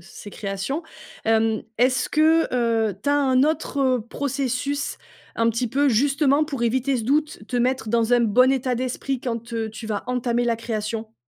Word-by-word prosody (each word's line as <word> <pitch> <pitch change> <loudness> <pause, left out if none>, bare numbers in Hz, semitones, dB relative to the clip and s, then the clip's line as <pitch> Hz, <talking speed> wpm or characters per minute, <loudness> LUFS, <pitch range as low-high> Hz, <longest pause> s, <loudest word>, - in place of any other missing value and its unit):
ces 195 +3 -11
créations. 200 - -4 0.4
Hem, 225 0 +2
est-ce 255 +2 +2
que, 320 +2 +4
heu, 225 -4 +1
tu 285 - +1
as - - +3
un 260 -2 +3
autre 275 -4 +1
processus 275 +1 -2 0.4
un 230 0 +3
petit 230 +2 -2
peu, 280 +4 +2
justement, 280 +4 +3
pour 275 -6 -5
éviter 260 +3 +1
ce 230 - -3
doute? 290 -3 0
Te 250 - -3
mettre 250 -1 0
dans 235 +1 +3
un 245 - +4
bon 245 +3 +4
état 255 -1 0
d'esprit 255 +1 -3
quand, 235 -1 -5
heu, 225 -1 -2
tu 220 +1 -8
vas 210 -2 -2
entamer 245 -1 0
la 235 -1 +1
création? 220 -1 -4
245 Hz, 175 wpm, -23 LUFS, 225-275 Hz, 0.4 s, que